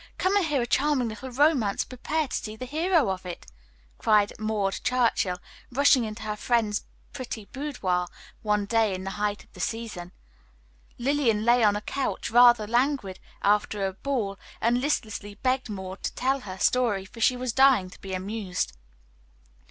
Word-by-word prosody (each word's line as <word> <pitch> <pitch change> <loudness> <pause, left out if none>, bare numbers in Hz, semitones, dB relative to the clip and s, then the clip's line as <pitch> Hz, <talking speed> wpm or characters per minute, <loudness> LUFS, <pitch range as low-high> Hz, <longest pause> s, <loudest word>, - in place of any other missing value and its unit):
Come 375 +2 +1
and 405 - +4
hear 285 -5 +1
a - - -1
charming 270 -2 +1
little 220 +5 -7
romance, 255 -6 +2
and - - -20
prepare 300 +5 -2
to - - -4
see 215 0 -4
the 255 - -6
hero 315 - +2
of 190 0 -5
it!" 180 -2 -7 0.5
cried 210 -1 +3
Maud 215 -3 -1
Churchill, 230 -7 +1 0.3
rushing 265 -1 +4
into 215 0 -6
her 210 -1 -3
friend's 215 -2 0 0.3
pretty 245 -6 -6
boudoir 200 -11 -2 0.3
one 210 -1 +1
day 220 -2 +2
in 185 - -6
the 195 - -4
height 205 0 -2
of - - -29
the - - -13
season. 215 -6 -4 0.9
Lillian 240 -5 +1
lay 240 0 +5
on 205 -1 +4
a 205 - -2
couch, 270 +1 -3
rather 240 -2 +7
languid 240 -4 0 0.2
after 205 0 +2
a 190 - -2
ball, 205 -3 -2 0.2
and 240 +2 +2
listlessly 215 -7 -2
begged 255 +2 0
Maud 190 -2 -6
to - - -3
tell 265 +2 +1
her 190 -7 -8
story, 210 -2 +2
for 230 +4 -11
she 250 +3 +4
was 250 -2 -2
dying 260 -9 +4
to - - -15
be 190 -1 -4
amused. 185 - -3
225 Hz, 175 wpm, -26 LUFS, 200-255 Hz, 0.9 s, rather